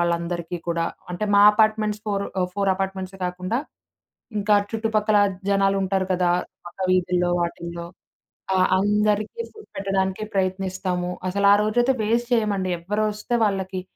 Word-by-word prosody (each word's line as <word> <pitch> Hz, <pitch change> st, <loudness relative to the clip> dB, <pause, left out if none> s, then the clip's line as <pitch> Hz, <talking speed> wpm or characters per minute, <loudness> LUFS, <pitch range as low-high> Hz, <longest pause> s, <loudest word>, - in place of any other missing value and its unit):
వాళ్ళందరికీ 170 Hz, 0 st, -1 dB
కూడా 170 Hz, 0 st, 0 dB, 0.3 s
అంటే 180 Hz, +4 st, -2 dB
మా 200 Hz, -, +6 dB
అపార్ట్‌మెంట్స్ 215 Hz, -1 st, +2 dB
ఫోర్ 200 Hz, -1 st, -1 dB, 0.2 s
ఆహ్, 180 Hz, -, 0 dB
4 200 Hz, -1 st, +1 dB
అపార్ట్‌మెంట్సే 190 Hz, 0 st, -4 dB
గాకుండా 185 Hz, +5 st, -2 dB, 0.8 s
ఇంకా 210 Hz, +1 st, +3 dB, 0.2 s
చుట్టుపక్కల 220 Hz, -2 st, +1 dB, 0.3 s
జనాలుంటారు 195 Hz, -1 st, +1 dB
కదా! 180 Hz, -1 st, +2 dB, 0.4 s
పక్క 175 Hz, -, -12 dB
వీధుల్లో 180 Hz, -1 st, +2 dB
వాటిల్లో 170 Hz, 0 st, -4 dB, 0.7 s
ఆ! -, -, +3 dB, 0.2 s
అందరికీ 210 Hz, -, +1 dB
ఫుడ్ 430 Hz, -1 st, -15 dB
పెట్టడానికే 195 Hz, +1 st, -1 dB
ప్రయత్నిస్తాము. 185 Hz, -1 st, -1 dB, 0.2 s
అసలరోజైతే 210 Hz, +6 st, +3 dB
వేస్ట్ 235 Hz, +3 st, 0 dB
చేయమండి. 205 Hz, -5 st, +1 dB
ఎవరొస్తే 210 Hz, +5 st, -1 dB
వాళ్ళకి 190 Hz, -2 st, -2 dB
195 Hz, 115 wpm, -23 LUFS, 180-210 Hz, 0.8 s, మా